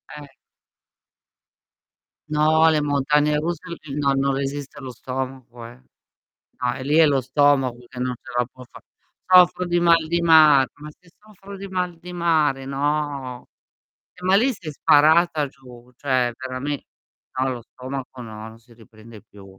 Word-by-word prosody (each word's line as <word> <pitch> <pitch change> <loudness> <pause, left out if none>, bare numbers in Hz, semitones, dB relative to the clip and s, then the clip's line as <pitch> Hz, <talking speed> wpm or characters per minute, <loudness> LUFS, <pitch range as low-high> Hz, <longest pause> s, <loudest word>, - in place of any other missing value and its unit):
Eh. 150 -1 -10 2.0
No, 155 +1 +3
le 155 -1 +2
montagne 150 +1 +1
russe 165 +2 -2 0.2
eh 145 -3 -9
no, 140 -2 +1
non 135 0 0
resiste 140 +1 -5
lo 130 -1 -7
stomaco, 125 -1 -7
eh. 120 +2 -13 0.8
No, 125 -1 0
e 130 - -7
lì 145 +3 +1
è 165 - +7
lo 140 -2 +2
stomaco 135 -1 +2
che 125 - -12
non 125 0 -2
ce 120 - -14
la 125 - +1
può 130 -1 -14
fa - - -15 0.5
soffro 180 0 +5
di 175 0 +1
mal 165 -2 +4
di 170 +1 -1
mar 155 -5 +6
ma 150 +1 -11
se 180 - -24
soffro 200 -1 -13
di 195 0 -8
mal 180 -2 -3
di 180 +1 -10
mare, 155 -6 +1
no. 140 -2 -3 0.7
Eh, 180 - -17
ma 190 +1 +4
lì 245 +7 +3
sei 180 -9 -8
sparata 155 +1 +3
giù, 125 -2 -16
cioè 130 -3 0
verame 130 +2 -5 0.6
no, 130 +1 +1
lo 120 - -8
stomaco 130 +2 -8
no, 110 -1 -9
non 110 0 -16
si 120 +1 -22
riprende 110 -1 -16
più. 105 -3 -17
140 Hz, 160 wpm, -22 LUFS, 125-160 Hz, 2.0 s, è